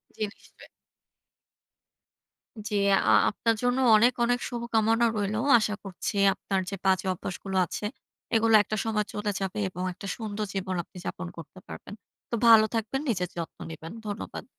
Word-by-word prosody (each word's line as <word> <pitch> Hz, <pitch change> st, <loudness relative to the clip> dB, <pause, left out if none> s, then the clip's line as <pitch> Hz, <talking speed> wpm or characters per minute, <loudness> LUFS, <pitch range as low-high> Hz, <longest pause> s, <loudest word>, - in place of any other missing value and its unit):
জী, 215 Hz, -, -3 dB
নিশ্চয়ই। -, -, -18 dB, 2.0 s
জী, 210 Hz, -, -2 dB, 0.3 s
আ -, -, +6 dB, 0.2 s
আপনার 230 Hz, +2 st, 0 dB
জন্য 245 Hz, +1 st, +2 dB, 0.2 s
অনেক, 240 Hz, +4 st, +5 dB
অনেক 245 Hz, +1 st, +2 dB
শুভকামনা 230 Hz, -1 st, +1 dB
রইলো। 205 Hz, +1 st, -1 dB, 0.2 s
আশা 210 Hz, -1 st, -1 dB
করছি 195 Hz, +1 st, -5 dB, 0.2 s
আপনার 195 Hz, 0 st, -2 dB
যে 195 Hz, -, -4 dB
বাজে 190 Hz, 0 st, +2 dB
অভ্যাসগুলো 190 Hz, +1 st, -5 dB
আছে, 175 Hz, -, -6 dB, 0.5 s
এগুলো 225 Hz, 0 st, +3 dB
একটা 215 Hz, -, -3 dB
সময় 215 Hz, -1 st, 0 dB
চলে 210 Hz, 0 st, -2 dB
যাবে 195 Hz, 0 st, -3 dB
এবং 180 Hz, 0 st, -6 dB
একটা 195 Hz, -, -9 dB
সুন্দর 215 Hz, -2 st, -4 dB
জীবন 190 Hz, -1 st, -3 dB
আপনি 180 Hz, -, -16 dB
যাপন -, -, -4 dB
করতে 165 Hz, +3 st, -11 dB
পারবেন। -, -, -9 dB, 0.4 s
তো -, -, -1 dB
ভালো 225 Hz, -1 st, +8 dB
থাকবেন, 225 Hz, +4 st, -1 dB
নিজের 180 Hz, -6 st, -1 dB
যত্ন 165 Hz, -, -5 dB
নিবেন। 160 Hz, 0 st, -8 dB, 0.2 s
ধন্যবাদ। 205 Hz, +1 st, -6 dB
210 Hz, 150 wpm, -27 LUFS, 190-225 Hz, 2.0 s, ভালো